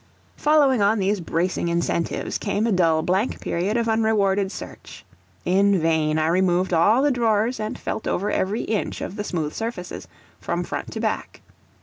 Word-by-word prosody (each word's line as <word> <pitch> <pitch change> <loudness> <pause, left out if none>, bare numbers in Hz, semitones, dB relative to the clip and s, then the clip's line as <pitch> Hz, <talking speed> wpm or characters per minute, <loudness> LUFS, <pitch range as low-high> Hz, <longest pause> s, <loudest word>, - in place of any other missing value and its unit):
Following 285 -6 +3
on 205 +3 +3
these 200 +1 0
bracing 170 +1 -1
incentives, 170 0 -1
came 210 +1 -1
a 230 - +1
dull 165 -4 +3
blank 190 +7 0
period 190 +7 -1
of 230 -1 0
unrewarded 205 -3 +2
search. - - -10 0.4
In 195 +1 +3
vain 160 -1 +1
I 155 - +1
removed 180 +2 +2
all 210 +10 +4
the 290 - +3
drawers 230 -1 +1
and 215 0 -3
felt - - -4
over 200 +3 -1
every 200 +4 -1
inch 215 -3 -2
of 190 - -5
the 205 - -3
smooth 160 -7 -3
surfaces, 225 -6 -5 0.3
from - - -2
front - - -5
to - - -4
back. - - -3
200 Hz, 165 wpm, -23 LUFS, 175-220 Hz, 0.4 s, all